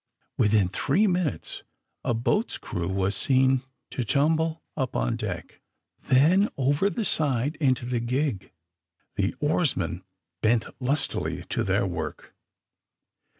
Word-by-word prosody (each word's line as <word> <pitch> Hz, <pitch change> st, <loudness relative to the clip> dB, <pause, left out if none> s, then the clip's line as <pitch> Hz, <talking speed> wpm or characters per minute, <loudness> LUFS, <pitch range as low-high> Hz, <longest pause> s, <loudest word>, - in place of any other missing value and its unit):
Within 105 Hz, -2 st, +3 dB
three 140 Hz, -, +1 dB
minutes 180 Hz, -, -1 dB, 0.4 s
a 120 Hz, -3 st, 0 dB
boat's 210 Hz, -, 0 dB
crew 85 Hz, 0 st, -4 dB
was 95 Hz, +1 st, 0 dB
seen 130 Hz, -1 st, +3 dB, 0.3 s
to 125 Hz, -, -2 dB
tumble 160 Hz, +6 st, +1 dB
up 130 Hz, -4 st, -2 dB
on 115 Hz, -, 0 dB
deck, 95 Hz, -8 st, -6 dB, 0.4 s
then 170 Hz, +11 st, +4 dB
over 145 Hz, +8 st, +2 dB
the 225 Hz, +1 st, -2 dB
side 145 Hz, -3 st, +1 dB
into 130 Hz, -5 st, +1 dB
the 125 Hz, -1 st, -1 dB
gig. 120 Hz, -4 st, -1 dB, 0.6 s
The 100 Hz, 0 st, 0 dB
oarsmen 125 Hz, -, 0 dB, 0.4 s
bent 115 Hz, +1 st, +3 dB, 0.2 s
lustily 140 Hz, +3 st, -1 dB
to -, -, 0 dB
their -, -, +1 dB
work. -, -, -5 dB
130 Hz, 120 wpm, -26 LUFS, 110-155 Hz, 0.6 s, then